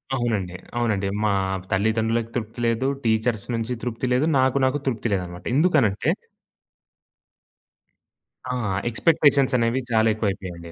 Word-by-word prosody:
అవునండి. 105 -8 -1 0.2
అవునండి. 105 -5 0 0.2
మా 105 - +2 0.4
తల్లిదండ్రులకు 110 +3 +1
తృప్తి 115 -1 -4
లేదు. 115 +3 +1 0.2
టీచర్స్ 110 -1 +1
నుంచి 115 +2 -2
తృప్తి 120 0 -3
లేదు. 130 +4 +2
నాకు 130 +1 +3
నాకు 130 +2 +1
తృప్తి 120 -2 -1
లేదనమాట. 90 -2 -4
ఎందుకనంటే 140 - +3 2.4
ఆ! - - -1 0.3
ఎక్స్‌పెక్టేషన్స్ 140 0 +3
అనేవి 115 +2 +1
చాలా 110 0 +4
ఎక్కువైపోయాయండి. 95 -5 -4
115 Hz, 110 wpm, -23 LUFS, 105-125 Hz, 2.4 s, చాలా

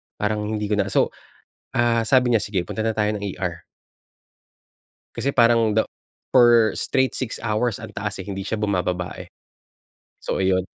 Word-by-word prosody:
parang 105 0 -1
hindi 105 -1 -3
ko - - +3
na" 100 - +1
So, - - +3 0.7
ah, 120 -1 +3
sabi 125 -1 +4
niya, 110 - +3
"Sige 95 -4 -2
punta 110 - -4
na 110 0 0
tayo 105 0 +2
ng 105 - -5
ER." 90 -4 -4 1.5
Kasi 120 +4 -2
parang 115 -2 +4
the 110 - +4 0.5
for 120 -3 +6
straight 130 -1 0
6 130 -4 -4
hours 110 0 0
ang - - -9
taas, - - -4
eh, 95 - -6
hindi 95 -1 -5
siya 110 - -2
bumababa 90 -4 -1
eh. - - -9 0.9
So, - - -3
iyon. 95 -1 +2
105 Hz, 165 wpm, -23 LUFS, 100-115 Hz, 1.5 s, for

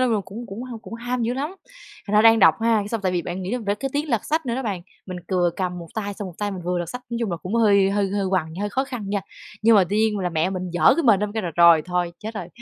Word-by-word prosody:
là 255 - +3 0.2
cũng 230 +5 -8
cũng 205 +4 -7
h 250 -2 -7
cũng - - -8
ham 245 +1 -3
dữ 235 +2 0
lắm! 290 +7 -3 0.5
Thành 205 - -2
ra 215 - +6
đang 225 0 +7
đọc 165 -6 +6
ha, 230 0 +3
cái 205 - -3
xong 225 0 -2
tại 185 -2 0
vì 175 -2 0
bạn 180 +2 -5
nghĩ 185 - -4
làm 245 -3 -3
ra 200 0 +1
cái 270 +5 -4
tiếng 295 +2 -1
lật 230 -4 0
sách 315 -2 -1
nữa 235 - -1
đó 265 - -2
bạn, 200 -6 -3 0.3
mình 185 - -6
vừa 180 -2 +2
cầm 180 -2 -2
một 170 - -8
tay 205 -2 -3
xong 195 -1 -6
một 175 - -11
tay 205 -1 -1
mình 185 -3 -6
vừa 180 0 -1
lật 175 - -3
sách. 250 - -6
Nói 235 - -2
chung 225 -5 -1
là 170 - -2
cũng 180 +5 -6
hơi 200 -4 +4
hơi 200 -1 +1
hơi 200 -1 -1
quằn, 170 -4 -1
hơi 205 - -1
khó 265 +6 0
khăn 240 -7 -6
nha. 205 - 0 0.4
Nhưng 225 0 +6
mà 195 - +6
tuy 205 - +1
nhiên 215 -1 +2
là 180 -2 -1
mẹ 165 +2 0
mình 185 -1 -4
giở 175 - +5
cái 335 - 0
mền 220 -8 +4
ra 210 - +1
mình 205 - -9
kêu 220 - -1
là 175 - -3
"Rồi, 170 -2 +7
thôi 180 -1 -1
chết 220 +1 -7
rồi!", 180 -5 -5
205 Hz, 335 wpm, -23 LUFS, 185-230 Hz, 0.5 s, đang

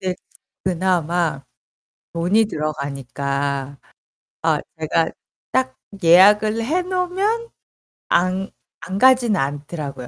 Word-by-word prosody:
네 185 -1 -2 0.5
그나마 175 -5 0 0.7
돈이 190 +7 +2
들어가니까 140 - -3 0.6
아 - - +2 0.2
제가 160 +1 +1 0.4
딱 130 0 0 0.3
예약을 210 +6 +6
해놓으면 365 - -1 0.6
안 185 +2 +1 0.3
안 185 +3 -4
가진 250 -2 +5
않더라고요. 145 -3 -4
175 Hz, 185 characters per minute, -21 LUFS, 140-215 Hz, 0.7 s, 예약을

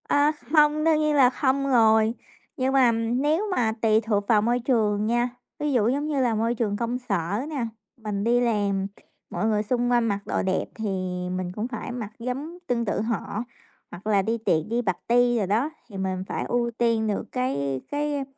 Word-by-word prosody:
À, 290 +1 +4 0.2
không, 300 -1 +4
đương 320 -1 +4
nhiên 305 -1 +2
là 265 -3 +6
không 275 +1 0
rồi. 220 -2 +4 0.4
Nhưng 265 0 0
mà 260 -3 +5
nếu 255 - 0
mà 225 -3 +2
tùy 220 -1 +4
thuộc 205 -2 -1
vào 215 -3 +4
môi 240 +3 +1
trường 215 -4 +1
nha, 240 +2 +1 0.3
ví 295 0 0
dụ 225 -4 +3
giống 285 +4 -1
như 290 -3 0
là 240 -3 +2
môi 230 +2 0
trường 210 -3 -1
công 235 +3 -1
sở 200 -6 -2
nè, 275 -6 -2 0.3
mình 210 -3 -3
đi 240 +2 +3
làm 205 -5 +1
kh - - -21 0.3
mọi - - -2
người 215 -1 +1
xung 245 +2 0
quanh 240 -1 +3
mặc 200 -2 0
đồ - - -1
đẹp 190 -1 0
thì 220 - -5 0.5
mình 185 -1 -3
cũng 220 +2 -2
phải 250 - -6
mặc 230 -4 -5
giống 270 +8 -4
tương 235 -1 0
tự 205 - -1
họ. 220 -1 -2 0.5
Hoặc 180 +5 -9
là 205 -2 +3
đi 225 +4 -1
tiệc, 160 -8 +1
đi 235 +2 +1
party 240 +4 +2
đồ 205 - 0
đó 220 +10 +1 0.2
thì 200 - -8
mình 190 -1 -2
phải - - -3
ưu 240 -1 0
tiên 230 -2 +2
được 205 - -1
cái 140 - -1
cái 290 -1 -1
235 Hz, 205 wpm, -25 LUFS, 210-255 Hz, 0.5 s, là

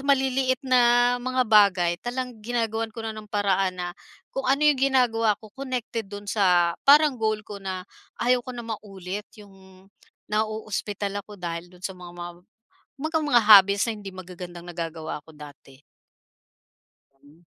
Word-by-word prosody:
maliliit 265 -1 +2
na 245 -1 +4
mga 255 0 0
bagay, 200 -6 +4
talagang 245 -2 -5
ginagawan 225 -1 -2
ko 225 +1 -8
na 220 - -3
ng 215 -1 -10
paraan 195 -3 +1
na 175 0 -3 0.4
kung 265 -1 -3
ano 280 +3 +3
'yong 290 -3 +4
ginagawa 235 -6 +3
ko 215 -2 -16
connected 250 -5 -4
do'n 205 0 -8
sa 180 -4 +3
parang 285 -3 +5
goal 215 -1 0
ko 205 -1 -9
na 185 -1 -5 0.3
ayaw 250 +1 +2
ko 250 0 -8
na 240 - -6
maulit 205 -2 -6
'yong 205 -2 -14 0.8
naoospital 210 -2 -2
ako 205 +1 -13
dahil 170 -1 -5
do'n 180 0 -18
sa 190 - -2
mga 180 -1 -11
ma 175 0 -6 0.7
kumbaga 315 +3 -1
mga 240 -5 +4
habits 200 -1 +7
na - - -1
hindi 195 -2 -9
magagandang 180 -1 -9
nagagawa 165 -2 -5
ko 160 - -15
dati. 145 -2 -14 1.4
Hmm. 150 +4 -20
210 Hz, 155 wpm, -25 LUFS, 185-245 Hz, 1.4 s, habits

